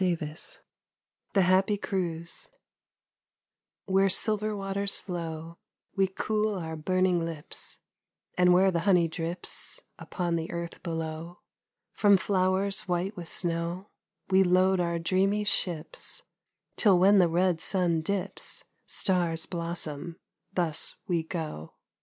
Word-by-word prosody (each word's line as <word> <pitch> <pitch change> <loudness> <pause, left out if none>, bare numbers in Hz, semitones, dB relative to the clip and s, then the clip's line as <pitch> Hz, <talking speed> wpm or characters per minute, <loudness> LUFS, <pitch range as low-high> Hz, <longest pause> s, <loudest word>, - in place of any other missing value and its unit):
44 170 -4 +1 1.1
THE 195 - +4
HAPPY 190 +3 +3
CRUISE 170 -4 -3 1.4
WHERE 195 0 +3
silver 215 +2 +3
waters 195 0 0
flow, 165 -2 -6 0.4
We 195 -1 +3
cool 215 +2 -1
our 160 -2 -4
burning 180 +2 +1
lips, 165 -3 -5 0.6
And 180 0 +5
where 190 +2 +5
the 170 - 0
honey 180 -2 +4
drips 165 +2 -3 0.2
Upon 175 -2 -2
the 165 +1 -4
earth 170 0 -5
below 165 0 -5 0.5
From 205 -2 +5
flowers 195 +2 +2
white 180 +3 -1
with 175 -2 -7
snow, 170 +2 -2 0.4
We 190 0 +6
load 185 +1 +4
our 170 -1 0
dreamy 195 +5 +1
ships, 180 - -2 0.5
Till 200 -5 +6
when 195 +3 +6
the 175 -2 +5
red 175 0 +1
sun 175 -5 +1
dips, 195 +3 -1 0.2
Stars 175 -4 +1
blossom, 170 -2 -3 0.4
thus 165 -4 -1
we 175 -3 +1
go 160 - -6
180 Hz, 115 wpm, -28 LUFS, 165-195 Hz, 1.4 s, We